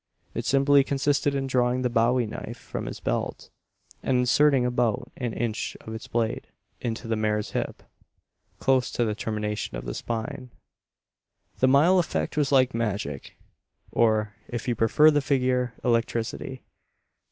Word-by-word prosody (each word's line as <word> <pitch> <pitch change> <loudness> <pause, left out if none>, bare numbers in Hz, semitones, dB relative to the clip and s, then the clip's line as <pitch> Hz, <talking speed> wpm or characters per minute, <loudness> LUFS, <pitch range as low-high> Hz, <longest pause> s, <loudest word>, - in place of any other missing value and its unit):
It - - -3
simply 140 +1 +5
consisted 140 +1 +1
in 135 -1 -1
drawing 125 -1 +1
the - - +3
bowie 120 +1 +3
knife 105 - -7
from - - -6
his - - -6
belt, - - -3 0.5
and 130 - +1
inserting 130 +1 +4
about 125 0 0
in 125 -3 -3
inch 110 -1 -3
of 110 - -8
its 110 - -7
blade 115 -1 -1 0.3
into 115 0 -4
the 115 - 0
mare's 105 -1 -1
hip, - - -3 0.7
close 130 -2 +2
to 120 - +1
the 110 - 0
termination 105 - -3
of - - -7
the - - -4
spine. 120 +2 -4 1.1
The 130 - +4 0.3
effect 165 -5 -1
was 145 -2 +1
like 130 -2 +4
magic; 100 -11 -3 0.5
or, 110 -2 +2
if 120 +1 -5
you 120 - +2
prefer 120 +8 +5
the 145 -1 +2
figure 125 -3 +1
electricity. 120 +2 -1
120 Hz, 145 wpm, -26 LUFS, 110-130 Hz, 1.1 s, simply